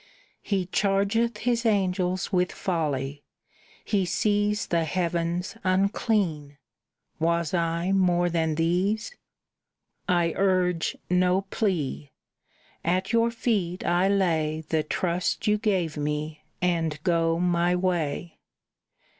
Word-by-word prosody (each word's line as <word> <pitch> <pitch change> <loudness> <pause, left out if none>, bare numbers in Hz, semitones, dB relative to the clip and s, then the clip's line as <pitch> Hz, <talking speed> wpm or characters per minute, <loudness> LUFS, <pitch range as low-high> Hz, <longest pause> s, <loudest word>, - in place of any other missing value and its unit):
He 195 -3 -1
chargeth 200 +4 +1
His 240 -1 +1
angels 185 -3 0
with 180 0 +2
folly; 145 -5 -2 0.6
He 200 -3 +1
sees 205 +3 +1
The 170 -1 +1
heavens 170 +2 -1
unclean. 185 -6 0 0.6
Was 170 0 0
I 170 +1 0
more 180 -2 +3
than 165 -2 0
these? 185 - 0 0.9
"I 175 -2 +2
urge 185 -3 +1
no 180 +1 +3
plea. 150 - -1 0.7
At 185 +5 0
your 230 0 +4
feet 205 -7 -1
I 175 +2 +3
lay 160 -6 +1
The 160 -1 +2
trust 180 +4 -1
you 210 -1 +2
gave 185 -8 0
me, 150 +1 -3 0.2
and 165 -4 +1
go 165 -2 +2
my 175 0 +2
way. 175 -2 -2
180 Hz, 105 wpm, -26 LUFS, 165-195 Hz, 0.9 s, your